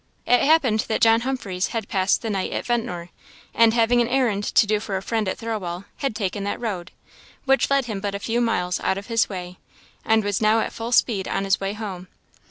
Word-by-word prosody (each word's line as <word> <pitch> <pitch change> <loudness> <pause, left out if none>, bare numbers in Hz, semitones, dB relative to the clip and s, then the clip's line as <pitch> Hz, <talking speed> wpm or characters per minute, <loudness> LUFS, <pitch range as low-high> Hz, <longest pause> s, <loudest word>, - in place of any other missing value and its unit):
It 245 - +4
happened 275 -8 +3
that 220 - +1
John 225 0 +5
Humphreys 225 -8 -2
had 225 -4 -4
passed 190 0 +1
the 225 - -2
night 195 -2 -2
at - - -3
Ventnor; 225 -8 -2 0.4
and 230 0 +4
having 240 +1 +3
an 235 - +1
errand 240 -5 +1
to - - +4
do 210 0 +1
for 205 -2 -3
a - - -4
friend 220 -2 -1
at - - -3
Thirlwall, 200 -5 -4
had 275 -7 -2
taken 200 -1 -2
that 200 - -3
road, 190 -7 -4 0.6
which 270 0 +3
led 275 -2 +2
him 215 -4 -4
but 200 0 -3
a - - -3
few 235 +3 -1
miles 180 -6 0
out 190 - 0
of 200 - -6
his 230 - +2
way, 180 -2 -7 0.4
and 220 0 +3
was 205 0 -1
now 215 +1 +4
at - - -2
full 230 +1 -5
speed 215 -5 +2
on 195 - -1
his 195 0 +2
way 195 +1 -2
home. 195 -4 -6
215 Hz, 225 wpm, -23 LUFS, 195-235 Hz, 0.6 s, John